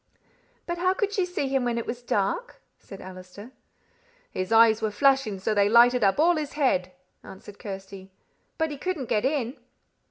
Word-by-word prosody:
"But 345 0 -4
how 370 +1 +2
could 410 0 -1
she 375 -3 0
see 355 -6 -2
him 270 -1 0
when 240 -1 -1
it 235 - -3
was 240 +1 -5
dark?" 210 - -2 0.2
said 195 - -12
Allister. 185 +5 -11 0.8
"His 185 +1 -4
eyes 225 -1 +5
were 220 - 0
flashing 265 -1 +2
so 190 +3 -2
that 205 -1 +2
they 200 - +3
lighted 240 +1 +5
up 195 -1 +3
all 335 +3 +3
his 300 -3 -4
head," 185 -11 0 0.3
answered 205 +1 -12
Kirsty. 195 -1 -9 0.5
"But 320 -1 -1
he 290 - -7
couldn't 320 -9 -3
get 215 +1 +1
in!" 265 -3 -1
235 Hz, 185 wpm, -26 LUFS, 200-290 Hz, 0.8 s, eyes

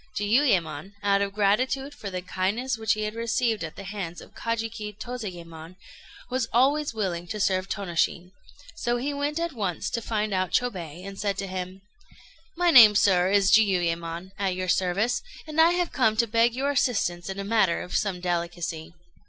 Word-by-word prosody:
Jiuyémon, 200 - +1
out 200 0 +3
of 200 0 -1
gratitude 255 +7 +1
for 205 - -7
the 185 -1 -5
kindness 205 +8 -1
which 220 0 +1
he 215 - -3
had 210 0 -3
received 230 -2 0
at 160 - -6
the 200 - -8
hands 190 -4 -6
of - - -14
Kajiki 225 -2 -4
Tozayémon, 175 -9 -7 0.5
was 255 -2 -1
always 285 +5 +3
willing 185 -6 -3
to 210 +4 -5
serve 190 -1 +1
Tônoshin; 180 -2 -1 0.4
so 240 -6 -1
he 275 +4 -2
went 290 +2 -2
at 335 -1 -2
once 195 -8 -3
to 230 - -2
find 215 -2 -2
out 185 -1 0
Chôbei, 180 -8 -2
and 195 0 -8
said 200 -1 -1
to 195 - -3
him 185 0 -6 0.7
"My 350 0 +3
name, 225 -8 +9
sir, 185 -3 +4
is 200 -1 +3
Jiuyémon, 175 -4 +1
at 195 -2 0
your 185 0 -3
service; 195 +7 +1 0.2
and 310 0 +2
I 335 +2 +5
have 355 -1 0
come 220 -5 +2
to 235 - +4
beg 230 +1 +2
your 275 +2 0
assistance 200 -10 0
in 190 - -5
a 200 - -3
matter 200 -4 +2
of 180 - -7
some 195 -3 0
delicacy." 170 -2 -3
205 Hz, 180 wpm, -26 LUFS, 180-235 Hz, 0.7 s, name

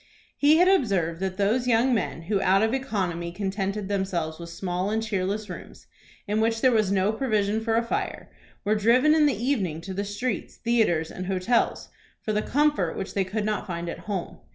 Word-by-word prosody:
He 295 +2 +5
had 360 +2 +5
observed 195 - +2
that 190 -1 -3
those 220 +5 +1
young 245 +2 +3
men 190 -6 -2
who 195 +3 0
out 195 +2 +4
of 225 +2 +1
economy 185 -10 -2
contented 195 +1 -3
themselves 180 -5 -2
with 170 0 -8
small 180 +2 -2
and 220 +1 0
cheerless 205 0 -2
rooms, 180 - -10 0.4
in 210 +2 +1
which 225 0 +1
there 260 - +5
was 215 -4 +2
no 195 +1 +2
provision 215 -3 0
for 225 0 +1
a 230 - +2
fire, 230 - -3 0.3
were 210 - +3
driven 235 +8 +4
in 310 -1 +5
the 275 - 0
evening 210 - -1
to 190 +2 -6
the 200 +2 -2
streets, 205 +2 -3
theatres, 220 -9 +1
and 185 0 -6
hotels, 195 +5 0 0.3
for 215 - -3
the 210 - +1
comfort 290 - +1
which 195 - -5
they 195 - +1
could 205 +3 -3
not 210 -1 -2
find 170 -1 -4
at - - -6
home. 190 -4 -4
205 Hz, 200 wpm, -26 LUFS, 185-230 Hz, 0.4 s, He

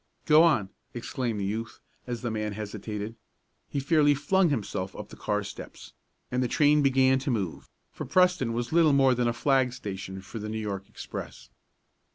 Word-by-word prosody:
"Go 155 0 +7
on!" 150 - +3 0.3
exclaimed 120 -2 -3
the 100 - -1
youth, 110 +3 -4 0.3
as 120 -1 -4
the 120 - -1
man 105 -1 -2
hesitated. 105 +1 -5 0.5
He 140 - -2
fairly 145 0 +4
flung 185 +5 +2
himself 100 -7 -3
up - - -8
the - - -11
car 105 0 -1
steps, 100 - -10 0.4
and 125 - 0
the 125 - +1
train 150 +3 +4
began 130 -1 +4
to 135 +2 -3
move, 100 -9 -3 0.2
for - - -6
Preston 180 -9 +3
was 120 +4 -3
little 165 -3 +5
more 135 -2 +5
than 120 -1 +1
a - - +2
flag 130 +1 +2
station 95 -5 -6
for 110 +3 -7
the 105 0 -5
New 110 - -3
York 100 -3 -4
express. - - -8
120 Hz, 185 wpm, -27 LUFS, 105-140 Hz, 0.5 s, Go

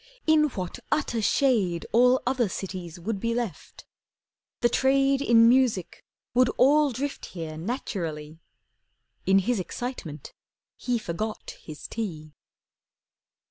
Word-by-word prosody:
In 315 -1 +5
what 185 - -4
utter 240 -6 0
shade 205 -8 +2
All 250 +2 +4
other 245 -4 +1
cities 180 -3 -6
would 200 +3 -3
be 230 +2 -1
left! 235 -6 -5 0.8
The 240 - +5
trade 270 +2 +2
In 230 -4 +6
music 240 -7 +2 0.3
would 250 0 +4
all 290 +2 +5
drift 275 +4 -4
here 165 -3 -6
naturally. 160 - -4 0.9
In 195 0 +5
his 215 +3 +1
excitement 180 - -6 0.4
he 245 -1 -1
forgot 215 +1 -4
his 155 -2 -9
tea. 160 -9 -5
230 Hz, 115 wpm, -26 LUFS, 175-255 Hz, 0.9 s, In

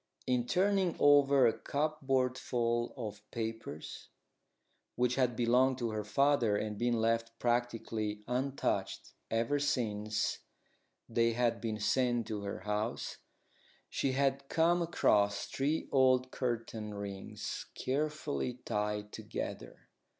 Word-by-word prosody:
In 125 -1 +1
turning 190 +1 +2
over 140 -2 +6
a 115 - +4
cupboardful 130 -5 0
of 105 -4 -5
papers, 115 -8 -6 0.9
which 125 0 +2
had 125 -2 +1
belonged 125 +3 +3
to 120 -3 -2
her 105 -1 -2
father 120 -2 +3
and 105 0 -3
been 120 +2 +1
left 115 +1 0
practically 115 -3 -1
untouched 130 +3 -1 0.2
ever 115 +6 +1
since 110 -6 0 0.7
they 115 0 +2
had 115 -1 +1
been 110 -2 -2
sent 120 +2 +1
to 105 -2 -3
her 100 -2 -5
house, 105 +3 -2 0.7
she 135 - 0
had 135 0 0
come 170 +2 +3
across 105 -11 +2
three 145 +4 -1
old 130 -1 +4
curtain 115 -4 -3
rings 100 -1 -5
carefully 150 -1 -1
tied 105 0 -2
together. - - -6
120 Hz, 115 wpm, -33 LUFS, 110-135 Hz, 0.9 s, over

